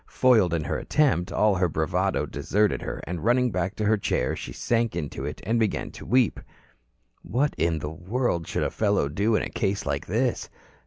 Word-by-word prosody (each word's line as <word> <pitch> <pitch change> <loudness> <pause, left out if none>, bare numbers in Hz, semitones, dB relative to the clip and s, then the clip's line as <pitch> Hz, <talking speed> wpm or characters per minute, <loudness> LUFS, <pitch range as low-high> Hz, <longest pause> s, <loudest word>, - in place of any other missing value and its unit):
Foiled 115 -9 +4
in 85 -2 0
her 70 - -2
attempt, 135 - +1
all 105 -1 +3
her 90 -2 +1
bravado 90 +5 0
deserted 105 0 0
her - - -5
and 90 -1 -5
running 125 +2 +3
back 90 +1 -2
to 105 - -2
her 110 +1 +3
chair, 65 -10 0
she - - -7
sank 115 -5 0
into 75 -5 -4
it 75 - -5
and 115 +1 +1
began 110 -3 -1
to - - -11
weep. 125 +2 +3 0.8
What 130 - 0
in 85 -1 +1
the 75 0 -4
world 90 +1 -2
should - - -1
a - - -1
fellow 100 -8 +1
do 100 +9 +1
in - - +1
a - - -4
case 100 0 -1
like 70 0 -2
this? 120 +6 0
100 Hz, 200 wpm, -26 LUFS, 85-115 Hz, 0.8 s, Foiled